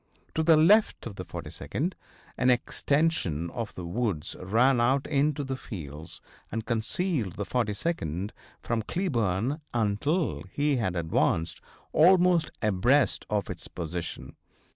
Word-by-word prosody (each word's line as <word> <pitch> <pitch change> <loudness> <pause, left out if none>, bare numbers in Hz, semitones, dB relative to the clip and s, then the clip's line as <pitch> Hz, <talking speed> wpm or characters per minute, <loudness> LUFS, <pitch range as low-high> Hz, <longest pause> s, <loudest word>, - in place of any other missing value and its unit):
To 160 - +1
the 160 0 +6
left 205 +8 +4
of 115 -4 -6
the 90 - -4
42d 125 - -4 0.4
an 130 - +2
extension 125 - +1
of 115 -3 -5
the 90 - -6
woods 90 -4 -2
ran 120 +7 +3
out 130 +3 +2
into 145 0 +1
the 135 -1 -3
fields 80 - -8 0.3
and 115 0 -3
concealed 115 - -1
the 105 0 -4
42d 105 - -2 0.3
from 115 -1 0
Cleburne 125 - -1
until 115 - 0
he 145 -1 +1
had 105 -7 -1
advanced 80 0 0 0.3
almost 175 0 +5
abreast 110 +6 +2
of 105 -1 0
its 85 -2 -7
position. 85 0 -5
115 Hz, 125 wpm, -28 LUFS, 90-145 Hz, 0.4 s, the